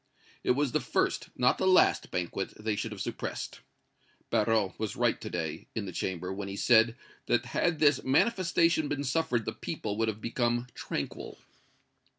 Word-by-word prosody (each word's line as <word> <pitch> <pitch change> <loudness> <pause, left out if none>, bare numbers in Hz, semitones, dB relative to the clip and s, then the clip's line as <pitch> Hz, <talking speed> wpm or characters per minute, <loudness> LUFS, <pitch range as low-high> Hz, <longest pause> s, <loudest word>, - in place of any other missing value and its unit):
It 125 - +3
was 145 -3 +1
the - - +2
first, - - 0
not 125 - +3
the - - +2
last 185 -1 +4
banquet 90 +2 -3
they 105 0 -1
should 110 +2 -3
have 105 - -6
suppressed. - - -4 0.7
Barrot 105 -3 +1
was 110 -2 -2
right - - +1
to - - -5
day, 80 -2 -4
in 110 -3 -2
the 95 - -5
Chamber, 90 +1 -3
when 100 0 -5
he 100 - -5
said 115 +1 +4 0.3
that - - +2
had 170 -2 0
this 145 -3 +4
manifestation 170 - +3
been 145 0 -2
suffered 130 -4 0
the 110 - -3
people 110 -7 -4
would 115 0 +1
have 110 -1 -2
become 120 +1 0
tranquil." - - -5
115 Hz, 170 wpm, -30 LUFS, 100-145 Hz, 0.7 s, last